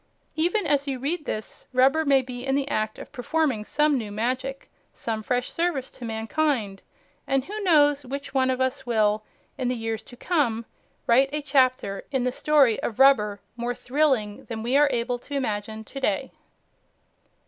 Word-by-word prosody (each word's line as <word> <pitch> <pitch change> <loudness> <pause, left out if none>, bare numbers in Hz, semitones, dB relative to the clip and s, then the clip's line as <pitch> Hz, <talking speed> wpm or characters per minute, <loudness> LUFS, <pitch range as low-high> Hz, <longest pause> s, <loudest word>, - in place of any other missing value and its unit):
Even 350 +6 +1
as 285 -1 +2
you 270 -2 -1
read 295 +5 -2
this, 215 - -5
rubber 270 +5 +4
may 275 -3 +4
be 245 -1 -7
in 270 0 0
the 280 0 0
act 215 -3 -1
of - - -10
performing 275 -3 0
some 295 +4 +2
new 215 -3 -6
magic, 255 +5 -2 0.2
some 220 -1 -4
fresh 245 +3 -1
service 330 -6 -1
to - - -12
mankind. 225 -2 -1 0.5
And 270 -1 +1
who 420 +2 -5
knows 290 -6 +4
which 280 +2 -6
one 260 -1 +2
of 260 0 0
us 260 +1 0
will, 215 -3 +2 0.4
in 255 - 0
the 250 - 0
years 225 -1 -3
to 245 +2 -15
come, 240 -10 0 0.4
write 265 +4 +4
a 300 0 -2
chapter 255 -8 +1
in 265 -3 0
the 250 - +1
story 275 -5 +3
of 220 - -3
rubber 210 -7 +4
more 240 0 -3
thrilling 250 -5 0
than 225 -2 -5
we 245 +3 0
are 290 0 +5
able 245 0 -1
to 285 - -7
imagine 220 -4 -3
to 275 - -8
day! 265 0 -1
255 Hz, 180 wpm, -25 LUFS, 225-285 Hz, 0.5 s, are